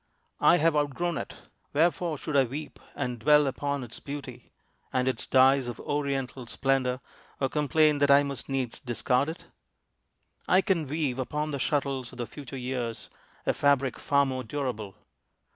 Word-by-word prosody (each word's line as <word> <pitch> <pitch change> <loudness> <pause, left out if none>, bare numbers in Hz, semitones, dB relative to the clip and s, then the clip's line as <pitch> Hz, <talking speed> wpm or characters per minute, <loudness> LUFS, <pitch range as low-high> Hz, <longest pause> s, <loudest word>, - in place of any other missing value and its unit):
I 175 - +6
have 160 0 +3
outgrown 150 +3 0
it. - - -7 0.4
Wherefore 165 +1 +2
should 150 +1 -4
I 135 -1 +5
weep 145 +5 -7 0.2
And 125 -1 -3
dwell 150 +4 +5
upon 140 +1 -2
its 120 - -9
beauty, 140 -4 -8 0.4
and 130 0 +1
its 130 - -1
dyes 130 0 +5
Of 120 - -5
Oriental 135 -3 -2
splendor, 130 0 0 0.4
or 135 - +1
complain 150 0 +3
That 145 0 +3
I 140 +1 +7
must 140 -1 -5
needs 130 -3 -2
discard 125 +3 0
it? 165 - -8 1.0
I 185 - +5
can 170 -6 0
weave 140 -3 -1
Upon 150 +4 -2
the 140 - -3
shuttles 135 -4 -1
of - - -13
the 120 - -3
future 140 +1 -9
years 125 -2 -4 0.3
A - - +2
fabric 140 -2 +2
far 140 0 +3
more 130 -1 -3
durable. 110 -7 -4
140 Hz, 160 wpm, -28 LUFS, 130-150 Hz, 1.0 s, I